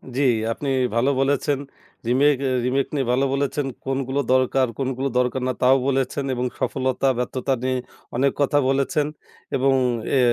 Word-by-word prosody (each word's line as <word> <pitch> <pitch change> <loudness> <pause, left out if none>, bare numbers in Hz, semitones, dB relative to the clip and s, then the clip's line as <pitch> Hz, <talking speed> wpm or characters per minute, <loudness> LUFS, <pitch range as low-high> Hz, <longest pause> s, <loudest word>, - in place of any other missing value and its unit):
জি 135 - +1 0.3
আপনি 140 +4 -3 0.3
ভালো 120 +4 +3
বলেছেন। 140 +1 +1 0.5
রিমেক 140 +4 +4
এ - - +1 0.2
রিমেক 135 +2 +1
নিয়ে 135 -4 0
ভালো 130 +2 +2
বলেছেন। 140 +1 -1 0.2
কোনগুলো 135 0 -1
দরকার, 130 0 +3
কোনগুলো 135 0 -1
দরকার 125 +1 +1
না, 130 - 0
তাও 130 +1 +6
বলেছেন 135 +1 0
এবং 125 0 -1
সফলতা, 130 0 0
ব্যর্থতা 130 +2 -1
নিয়ে 130 0 0 0.4
অনেক 135 +3 +2
কথা 145 +1 +2
বলেছেন। 140 +2 +1 0.5
এবং 135 +1 +3 0.4
এ - - +4
135 Hz, 150 wpm, -23 LUFS, 130-140 Hz, 0.5 s, তাও